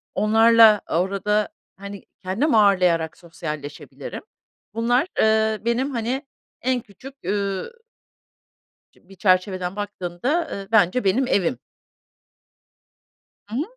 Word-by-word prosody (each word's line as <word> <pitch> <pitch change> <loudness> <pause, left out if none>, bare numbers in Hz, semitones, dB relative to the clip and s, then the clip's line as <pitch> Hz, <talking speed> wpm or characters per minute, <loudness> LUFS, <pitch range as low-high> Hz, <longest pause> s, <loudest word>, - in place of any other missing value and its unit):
onlarla 225 0 +6
orada, 200 +4 0 0.3
hani, 200 0 -9 0.2
kendim 225 +9 0
ağırlayarak 180 -6 +3
sosyalleşebilirim. 150 -4 -8 0.5
Bunlar, 245 +7 +1
ııı, 220 0 +2
benim, 245 +4 0
hani, 250 +3 -3 0.4
en 255 0 0
küçük, 255 +7 -13
üüü 200 - -3 1.1
çi 180 - -28
bir 195 - -14
çerçeveden 185 0 +1
baktığımda, 205 - -2
ııı, 195 -1 -6
bence 215 +3 +3
benim 230 +7 +2
evim. 170 - 0 1.9
Hı 220 - -7
hı. 280 - 0
205 Hz, 100 wpm, -22 LUFS, 185-235 Hz, 1.9 s, onlarla